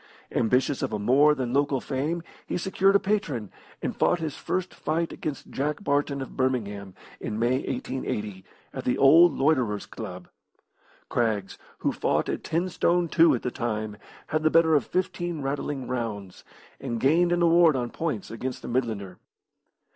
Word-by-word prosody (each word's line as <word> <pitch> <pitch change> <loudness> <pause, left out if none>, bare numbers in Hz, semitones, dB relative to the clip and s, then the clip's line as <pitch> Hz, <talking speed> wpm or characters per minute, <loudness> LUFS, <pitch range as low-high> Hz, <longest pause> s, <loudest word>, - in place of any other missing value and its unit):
Ambitious 125 +4 +1
of - - -1
a 105 - -1
more 140 +8 +4
than 125 -3 -3
local 140 -1 +2
fame, 150 +7 -2 0.2
he - - -1
secured 190 +2 +2
a - - +7
patron, 165 - -1 0.3
and - - -2
fought - - +2
his 160 -3 -3
first 185 0 -3
fight 165 +2 -2
against 150 -3 -6
Jack 150 +7 -2
Barton, 140 -3 0
of - - -11
Birmingham, 105 -7 -2 0.2
in 105 - -4
May 120 +3 +2
1880, 105 -7 -4 0.3
at - - -5
the 125 - 0
old 160 +4 +7
Loiterers' 130 -8 +1
Club. - - -8 0.8
Craggs, 105 -6 -1 0.2
who - - 0
fought - - 0
at - - -3
ten 170 +3 0
stone 175 -1 +1
two 160 -3 +5
at 120 - -5
the 125 - -2
time, 110 -3 -3 0.3
had 155 0 0
the 155 - +3
better 160 0 +4
of 145 -6 +3
fifteen 175 -4 -2
rattling 135 -1 -3
rounds, 110 -6 -4 0.4
and 120 -4 -3
gained 170 +7 +3
an 175 0 +2
award 170 -2 +5
on 120 -2 -2
points 150 - -3
against 125 +3 -5
the - - -6
Midlander. 110 -7 -2
135 Hz, 165 wpm, -26 LUFS, 115-165 Hz, 0.8 s, a